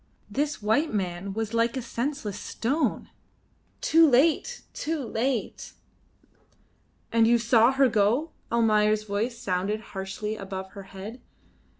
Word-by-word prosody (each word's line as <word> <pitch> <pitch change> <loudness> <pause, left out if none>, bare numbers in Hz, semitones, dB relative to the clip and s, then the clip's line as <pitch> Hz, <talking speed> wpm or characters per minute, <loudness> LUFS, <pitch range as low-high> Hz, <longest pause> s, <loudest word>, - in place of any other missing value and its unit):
This 290 -5 -2
white 285 +10 +2
man 190 -2 -3
was 220 +1 -3
like 230 +3 +1
a - - -2
senseless 235 -4 -3
stone. 280 +8 -1 0.7
Too 325 -1 +5
late! 315 - +2
Too 320 +1 -2
late! 235 +1 -2 1.4
"And 230 -1 +4
you 235 +1 +5
saw 235 +1 +4
her 270 0 +4
go?" 230 +8 +2 0.2
Almayer's 215 -2 +3
voice 215 +4 -2
sounded 195 +3 -1
harshly 195 +2 -4
above 190 -2 -6
her 200 0 -10
head. 215 +6 -8
225 Hz, 120 wpm, -26 LUFS, 205-260 Hz, 1.4 s, Too